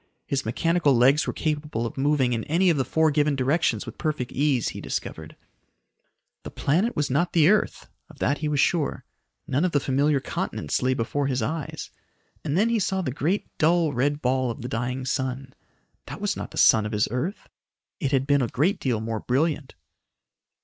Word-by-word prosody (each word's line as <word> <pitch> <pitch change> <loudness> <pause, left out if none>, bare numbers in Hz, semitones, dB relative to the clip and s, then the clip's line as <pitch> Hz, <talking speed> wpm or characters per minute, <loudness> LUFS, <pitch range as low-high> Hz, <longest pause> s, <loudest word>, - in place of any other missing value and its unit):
His 135 -3 -2
mechanical 165 +3 +2
legs 135 +5 +4
were - - 0
capable 150 -6 -2
of 115 - -5
moving 135 -2 +1
in 115 -1 -2
any 175 +4 +3
of 135 -6 0
four 160 +2 +2
given 150 0 +2
directions 135 -4 +1
with - - -10
perfect 150 -6 -2
ease, 140 -4 +1
he - - -7
discovered. - - -5 1.1
The - - -8
planet 185 +12 0
was 150 -2 -1
not 170 +6 +1
the 160 -3 +5
earth 210 +1 +1 0.2
of - - -16
that 140 +2 0
he 155 - -2
was 150 -1 0
sure. 155 0 +1 0.4
None 140 +5 0
of 185 - 0
the 145 - +4
familiar 140 +2 +1
continents 75 - -3
lay 130 0 +1
before 135 +4 -1
his 130 -4 -1
eyes. 155 +5 -4 0.5
And 150 +1 -1
then 220 +4 +3
he 235 -1 +1
saw 190 -1 -1
the 130 - -2
great 165 +10 -2
dull 165 -1 +3
red 145 +4 0
ball 130 0 +1
of 115 - -6
the - - -3
dying 125 +2 -3
sun. 130 0 -3 0.5
That - - -7
was - - -1
not - - -6
the - - -11
sun 110 -1 +5
of 105 - -7
his 105 - +2
earth. 155 - -3 0.5
It 140 -7 -1
had 135 -1 +2
been 140 0 +3
a 120 - +1
great 150 +11 0
deal 120 -5 -1
more 110 0 -3
brilliant. 145 +2 -1
140 Hz, 195 wpm, -25 LUFS, 130-155 Hz, 1.1 s, the